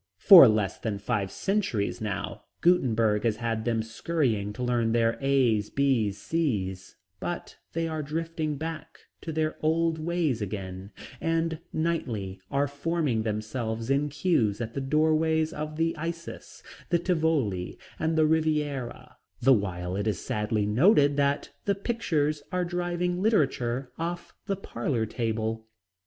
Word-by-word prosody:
For 180 - +10
less 105 -3 +1
than 110 -3 -2
five 100 -1 -1
centuries 155 - -1
now 105 -3 -4 0.2
Gutenberg 115 - +3
has 115 -3 +1
had 115 -1 -2
them 115 -2 +1
scurrying 115 -4 -1
to 125 - -5
learn 120 -2 +1
their 115 -1 +2
A, 130 -6 +3
B, 130 -7 +2
C's, 100 - -2 0.2
but 175 - -5 0.2
they 165 0 -1
are 160 -1 -3
drifting 160 0 -3
back 160 +2 -6 0.2
to 160 - -5
their 155 0 -1
old 160 +1 +1
ways 155 -7 0
again, 95 -1 -5 0.3
and 165 -1 0
nightly 115 - -2
are 140 +1 +1
forming 145 -4 -1
themselves 110 +2 -3
in 145 +2 +2
cues 135 - +1
at 115 -1 -4
the 140 - -3
doorways 155 +2 +2
of 155 +1 -5
the 165 +1 0
"Isis," 165 +1 -7 0.3
the 175 - +3
"Tivoli," 160 - 0 0.2
and 160 0 0
the 155 - +5
"Riviera," 150 -5 -1 0.2
the 135 - +5
while 90 -4 -1
it 100 +2 -2
is 105 -4 0
sadly 105 +1 -1
noted 145 - +4
that 140 0 +1
"'the 200 - +2
pictures' 165 -9 -1
are 180 -1 0
driving 175 0 -1
literature 135 - +1
off 170 +1 -4
the 200 - 0
parlor 120 -8 -2
table." 110 -1 -2
140 Hz, 140 wpm, -27 LUFS, 110-165 Hz, 0.3 s, For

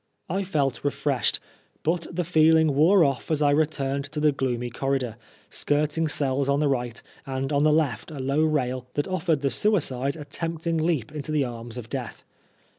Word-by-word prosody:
I 190 +4 0
felt 145 -9 -1
refreshed, 140 -4 0 0.4
but 165 +1 0
the 180 +1 -1
feeling 160 -2 +4
wore 170 +7 +5
ofE 140 -5 +1
as 155 -2 +1
I 145 - +4
returned 140 -2 0
to 150 +1 -5
the 150 0 +4
gloomy 125 -3 -2
corridor, 130 -2 -1 0.4
skirting 150 +2 0
cells 140 -2 0
on 140 0 +2
the 150 - +2
right, 125 -4 -1 0.3
and 135 +2 -2
on 140 - +3
the 155 +1 +4
left 145 -8 0
a 155 - -8
low 135 +3 +1
rail 130 -5 0
that 145 - 0
offered 180 -5 0
the 140 -1 0
suicide 140 - +1
a 150 -2 -8
tempting 165 +2 -3
leap 155 -7 0
into 150 0 -5
the 150 -3 +2
arms 120 -1 -7
of 120 -2 -7
Death. - - -6
145 Hz, 185 wpm, -25 LUFS, 135-155 Hz, 0.4 s, wore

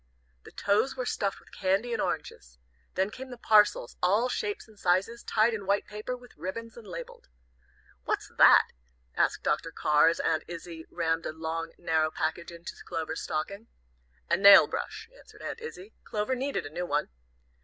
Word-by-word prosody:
The - - -12
toes 210 +7 +1
were 255 - -2
stuffed 200 -4 -1
with - - -21
candy 200 +5 0
and - - -1
oranges. - - -4 0.4
Then 190 +2 +1
came 260 +3 -8
the 245 - -8
parcels, 210 - +3
all 205 +8 +3
shapes 410 - -3
and 215 -2 -19
sizes, 195 +7 +1
tied 225 +2 +2
in 200 -3 -5
white 200 +1 +2
paper, 215 +4 -5
with 245 0 -17
ribbons, 230 +5 -6
and 230 -3 -12
labelled. 170 -2 -8 0.8
"What's - - -2
that?" - - +8 0.5
asked - - +1
Dr. - - 0
Carr, 150 +1 +4
as 165 - +2
Aunt 160 -1 +1
Izzie 170 -1 -8
rammed 165 -1 -1
a - - -3
long, 165 +1 -4
narrow 160 -2 +1
package 160 +2 -3
into 170 0 -8
Clover's 160 0 -4
stocking. 200 +8 -4 0.6
"A - - +2
nail 200 0 +9
brush," 435 +1 -5
answered - - -16
Aunt - - -5
Izzie. 215 - -9
"Clover 210 +4 -2
needed 270 +2 -2
a 145 - -7
new 180 +1 -3
one." 145 0 0
200 Hz, 175 wpm, -29 LUFS, 165-230 Hz, 0.8 s, nail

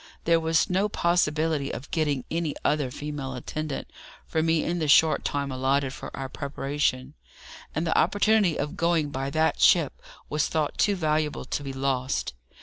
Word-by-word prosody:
There 165 0 +4
was 160 -1 +2
no 190 +3 +1
possibility 160 -5 +1
of 135 - -8
getting 145 -5 0
any 165 -3 -1
other 145 -3 +1
female 140 -1 -5
attendant 150 +3 -4 0.4
for 160 - -1
me 160 0 +2
in 175 +1 -1
the 155 - -1
short 155 +2 +5
time 140 -1 -2
allotted 135 +1 0
for - - -7
our 135 - -4
preparation, 140 -1 -2 0.6
and 160 +3 0
the 160 - 0
opportunity 205 -4 +3
of 145 +1 -3
going 170 -4 +1
by 135 0 -3
that 160 +3 +1
ship - - +4 0.3
was 150 0 0
thought 155 -2 -2
too 205 - +3
valuable 155 -5 -1
to 140 - -3
be 140 -1 -5
lost. 130 - -1
150 Hz, 165 wpm, -26 LUFS, 140-160 Hz, 0.6 s, short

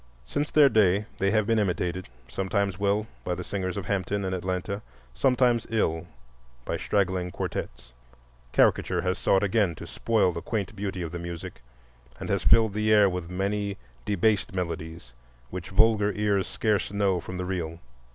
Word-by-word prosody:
Since 145 - -2
their 150 -2 +6
day 105 -4 +3
they 100 - +2
have 110 0 +2
been 115 +1 +2
imitated—sometimes 95 - -2
well, 100 +1 +1 0.2
by 90 - -1
the 90 - -5
singers 95 0 -3
of 100 - -4
Hampton 100 +1 -1
and 95 - -2
Atlanta, 95 +2 -3 0.3
sometimes 125 - +2
ill, 80 -8 0 0.6
by - - -2
straggling 95 -3 0
quartettes. - - -5 0.6
Caricature - - +3
has 90 0 -1
sought 95 +1 +3
again 100 -4 +2
to - - -9
spoil 110 -5 +1
the 85 - -5
quaint 105 -2 -3
beauty 95 -2 -3
of 80 - -5
the 85 - -5
music, 85 -5 -7 0.6
and - - -6
has - - +1
filled 110 -3 +5
the 105 +1 +1
air 105 -2 +7
with 90 -2 -3
many 100 +2 -2 0.3
debased 105 +1 +1
melodies 80 -5 -4 0.4
which 90 -2 -6
vulgar 105 +1 +4
ears 100 -2 +1
scarce 105 -3 0
know 100 -3 +1
from 90 +2 -7
the 90 - -3
real. 85 -3 -3
95 Hz, 160 wpm, -27 LUFS, 90-105 Hz, 0.6 s, air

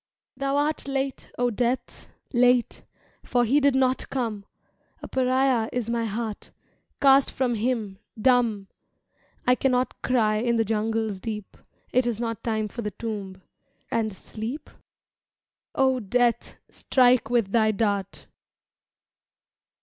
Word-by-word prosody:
Thou 275 0 -1
art 295 0 0
late, 270 -1 -3
O 245 0 +1
Death, 245 +3 -2 0.3
Late, 245 0 +3 0.4
For 245 -1 +1
he 270 +6 +3
did 280 -2 +3
not 260 -1 +1
come! 225 -6 -3 0.6
A - - -5
pariah 255 -2 +1
is 235 -2 -2
my 230 -1 0
heart, 220 0 -4 0.5
Cast 275 -1 +5
from 250 -2 -1
him 220 -4 -2 0.2
dumb! 230 -4 +2 0.8
I 250 - +5
cannot 255 0 0
cry 220 -4 +2
in 235 +2 +1
the 225 -1 +2
jungle's 220 -1 -1
deep 210 -1 -6 0.4
Is 250 0 +3
it 230 -2 -2
not 230 -3 -3
time 220 -2 -1
for 235 +3 -7
the 210 - -2
Tomb 200 -3 -6 0.5
and 225 -2 0
Sleep? 225 +8 -7 1.0
O 265 -1 +3
Death, 240 +2 0
strike 250 -2 +2
with 235 -5 +1
thy 220 -1 +3
dart! 200 -2 -1
235 Hz, 125 wpm, -25 LUFS, 215-255 Hz, 1.0 s, Cast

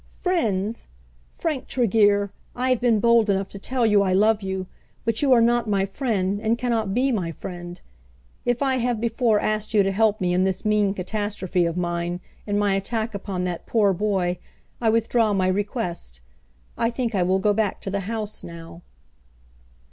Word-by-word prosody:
"Friends! 225 - -1 0.4
Frank 300 -5 -3
Tregear, 205 -4 +2 0.2
I 255 +1 0
have 255 - +1
been 235 -3 +3
bold 235 0 +4
enough 195 -1 +1
to 200 - -9
tell 250 +3 0
you 210 -2 +4
I 190 -2 +1
love 210 +2 +3
you; 190 -1 -3 0.4
but 230 -1 0
you 280 -2 +3
are 240 -2 +6
not 235 -1 +2
my 195 -2 +2
friend, 200 -3 -1
and 225 +1 +1
cannot 225 -5 -1
be 265 +2 +2
my 180 -8 -1
friend. 175 +1 -8 0.6
If 245 +2 0
I 265 -1 +1
have 240 -2 0
before 230 -1 +2
asked 215 +1 -2
you 205 - +6
to 195 - 0
help 215 +1 +2
me 180 -1 0
in 180 +1 +2
this 190 +2 -1
mean 210 -2 +2
catastrophe 190 -2 -1
of 170 +1 -3
mine, 175 0 -2 0.3
in 205 0 0
my 205 -1 +2
attack 220 +3 -2
upon 195 -2 -4
that 180 -2 -4
poor 205 -4 +3
boy, 185 -2 0 0.4
I 225 - +3
withdraw 225 -1 +2
my 185 -2 +1
request. 185 - -3 0.6
I 230 - +2
think 240 -1 -2
I 190 - +1
will 185 +2 +2
go 205 +2 +2
back 210 -1 0
to 195 - -5
the 200 - -1
house 215 -2 -4
now." 170 0 -10
205 Hz, 185 wpm, -24 LUFS, 190-230 Hz, 0.6 s, are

